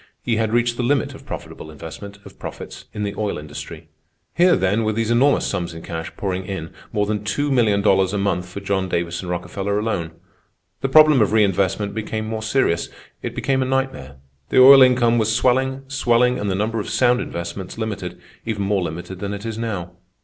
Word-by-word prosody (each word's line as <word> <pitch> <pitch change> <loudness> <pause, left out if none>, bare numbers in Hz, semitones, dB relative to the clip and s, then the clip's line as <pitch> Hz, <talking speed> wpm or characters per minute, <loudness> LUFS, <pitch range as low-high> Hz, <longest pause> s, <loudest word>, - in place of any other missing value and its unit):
He 115 -2 0
had 110 -1 0
reached 120 0 +1
the - - -1
limit 135 +3 +1
of - - -14
profitable 80 - -7
investment 80 +6 -9
of - - -14
profits - - -8
in 105 - -4
the 100 -1 -2
oil 105 -1 -1
industry. 75 -1 -8 0.5
Here, 175 +1 +5
then, 100 +4 +1
were 110 0 0
these 115 +1 -1
enormous 135 +4 +3
sums 85 -1 -3
in 80 - -9
cash 80 -1 -5
pouring 95 -2 -2
in—more 95 +2 -4
than 105 0 -1
$2,000,000 105 -5 +2
a 105 - -1
month 90 -3 -1
for 100 +2 -7
John 95 -1 -1
Davison 85 +1 -2
Rockefeller 95 +3 -2
alone. 95 -7 -2 0.7
The 135 - -1
problem 155 -2 +7
of 105 - +2
reinvestment 100 -1 +1
became 110 0 -3
more 110 0 -4
serious. 110 -7 +1 0.3
It - - -5
became 135 -1 0
a - - +1
nightmare. 135 - -2 0.3
The - - +4
oil 135 +1 +10
income 120 -2 +5
was 110 0 +1
swelling, 130 +2 +1
swelling, 125 -2 +2
and 105 - -2
the 95 - 0
number 110 +3 -1
of 105 - -4
sound 125 -1 +3
investments 85 +2 -6
limited, 100 -6 -4 0.2
even 105 -3 -2
more 100 -1 +1
limited 90 +2 -5
than 100 +1 -3
it 100 +2 -8
is 115 -1 -4
now. 100 -7 -3
105 Hz, 190 wpm, -21 LUFS, 95-120 Hz, 0.7 s, oil